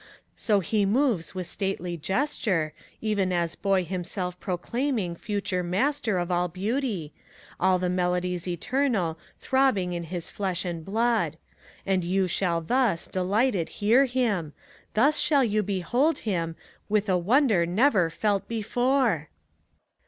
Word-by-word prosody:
So 210 -3 +2
he 210 +3 +1
moves 210 - +1
with 185 -1 -3
stately 185 -2 -3
gesture, 185 - -1 0.3
even 205 -4 0
as 170 -2 0
boy 195 -2 +1
himself 180 0 -3
proclaiming 200 +1 -2
Future 200 -1 -2
Master 215 +4 0
of 175 0 -2
all 175 0 +2
Beauty, 195 - -2 0.5
all 185 0 +4
the 180 0 -1
melodies 180 0 -1
eternal 180 - 0 0.2
Throbbing 260 -10 +1
in 170 -1 -4
his 175 0 -5
flesh 190 -2 -2
and 170 -2 -4
blood; 225 +4 +1 0.5
and 190 -2 +1
you 185 +2 +1
shall 170 -1 0
thus, 225 -1 +1
delighted, 195 0 0
hear 230 +7 +3
him, 225 - -1 0.2
— - - -28
Thus 280 +8 +4
shall 285 -3 +3
you 215 -2 +1
behold 210 - +1
him, 165 -6 -1 0.3
with 210 0 +1
a 185 - +3
wonder 205 - +3
never 195 -2 +3
felt 200 +4 0
before! 235 - +1
195 Hz, 135 wpm, -26 LUFS, 175-230 Hz, 0.5 s, all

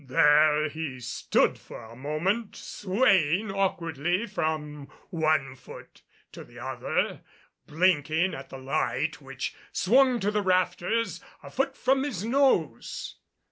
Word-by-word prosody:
There 150 +2 +4
he 150 -4 -5
stood 125 0 0
for - - -11
a 110 +1 -12
moment 165 - -2
swaying 195 - +1
awkwardly 175 -1 -1
from 155 -7 -3 0.2
one 155 -5 +1
foot - - -13 0.3
to - - -10
the - - -17
other, - - -2 0.5
blinking 160 +1 +2
at 135 -3 -8
the 135 - -8
light 135 +2 -2
which 135 -1 -5 0.2
swung 255 +4 +3
to 205 +2 +1
the 210 0 0
rafters 185 +1 0 0.2
a - - -10
foot 270 +1 -1
from 265 +1 +2
his 220 -9 -3
nose. 230 - 0
165 Hz, 125 wpm, -27 LUFS, 145-200 Hz, 0.5 s, There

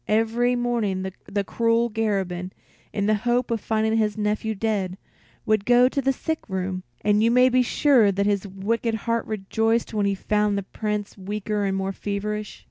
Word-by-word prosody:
Every 225 +3 +2
morning 215 -6 -1
the 200 0 -2
cruel 230 +3 +1
Garabin, 190 -4 -2 0.4
in 200 - -1
the 215 - +3
hope 245 0 +1
of 225 -3 0
finding 220 0 +1
his 215 -1 +1
nephew 215 +1 -1
dead, 195 -3 -1 0.5
would 215 -2 +2
go 245 +2 +5
to 275 +2 -1
the 270 0 +2
sick 320 +4 -2
room; 185 -1 -2 0.2
and 210 0 +3
you 230 - +4
may 250 +2 +5
be 255 0 +3
sure 250 -3 +4
that 200 +1 0
his 205 -1 0
wicked 220 +4 -1
heart 230 -1 0
rejoiced 225 +3 0
when 205 -2 +1
he 200 - +1
found 210 +1 +1
the 200 - -2
Prince 210 0 -4
weaker 205 +1 -2
and 195 0 0
more 195 0 -1
feverish. 205 +1 -4
215 Hz, 180 wpm, -24 LUFS, 200-230 Hz, 0.5 s, go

